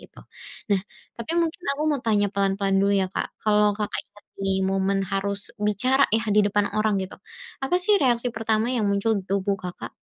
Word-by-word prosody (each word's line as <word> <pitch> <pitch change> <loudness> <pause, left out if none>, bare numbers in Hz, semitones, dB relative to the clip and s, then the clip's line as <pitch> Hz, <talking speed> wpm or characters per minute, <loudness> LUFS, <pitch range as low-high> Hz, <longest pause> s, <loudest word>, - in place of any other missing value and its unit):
gitu. - - -17 0.5
Nah, 195 - +2 0.4
tapi 235 +7 -5
mungkin 335 0 0 0.2
aku 300 - -2
mau 285 -3 -1
tanya 210 -3 +2
pelan-pelan 195 0 0
dulu, 200 +1 +2
ya, 190 - 0
Kak, - - -4
kalau 210 -1 +3
Kakak 210 -1 -2
inget 205 - -20 0.5
momen 195 0 +1
harus 200 +1 -2
bicara, 255 +7 +2
yah, 225 +1 +1
di 210 - +6
depan 205 0 +1
orang, 215 0 +2
gitu, 185 - -10 0.5
apa 310 +7 +1
sih 420 - +3
reaksi 245 -2 +2
pertama 225 -1 0
yang 230 -4 0
muncul 200 +3 +1
di - - -15
tubuh 195 0 0
Kakak? 180 -1 -7
210 Hz, 185 wpm, -24 LUFS, 200-230 Hz, 0.5 s, di